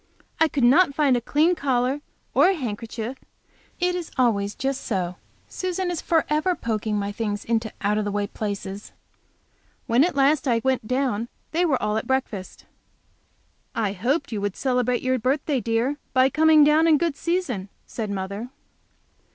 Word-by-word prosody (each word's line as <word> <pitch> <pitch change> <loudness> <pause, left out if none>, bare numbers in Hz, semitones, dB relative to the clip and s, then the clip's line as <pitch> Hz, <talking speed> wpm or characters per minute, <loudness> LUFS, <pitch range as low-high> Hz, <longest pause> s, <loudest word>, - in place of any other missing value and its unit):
I 320 - +5
could 285 -3 -1
not 280 +4 +5
find 280 -4 +3
a 240 - 0
clean 310 +8 +2
collar, 265 -2 0 0.3
or - - +5
a 390 - +2
handkerchief. 230 - -5 0.6
It 360 0 +1
is 355 -3 -4
always 205 -5 +1
just 270 0 -2
so. 180 -4 -2 0.3
Susan 370 0 -2
is 345 - -3
forever 320 +2 +1
poking 215 -4 -2
my 200 0 -2
things 205 -1 -3
into 225 -1 0
out 210 +1 +1
of 210 - -1
the 205 - -2
way 205 0 -1
places! 200 -1 -5 0.9
When 245 +2 +4
at 350 -3 0
last 280 +1 +3
I 235 -2 +3
went 260 -4 0
down, 250 -3 0 0.2
they 345 +3 +2
were 280 -6 +1
all 210 0 0
at 220 - -3
breakfast. 245 -8 -3 1.1
"I 215 -4 0
hoped 270 - -1
you 210 -3 -3
would 200 -1 -2
celebrate 250 -2 0
your 255 0 +1
birthday, 275 +3 0
dear, 235 +5 0 0.2
by 260 +1 +4
coming 315 -1 +6
down 305 +2 +5
in 315 -2 +6
good 330 -1 0
season," 285 - -2 0.2
said 220 -3 -5
mother. 200 +4 -4
255 Hz, 165 wpm, -24 LUFS, 215-300 Hz, 1.1 s, coming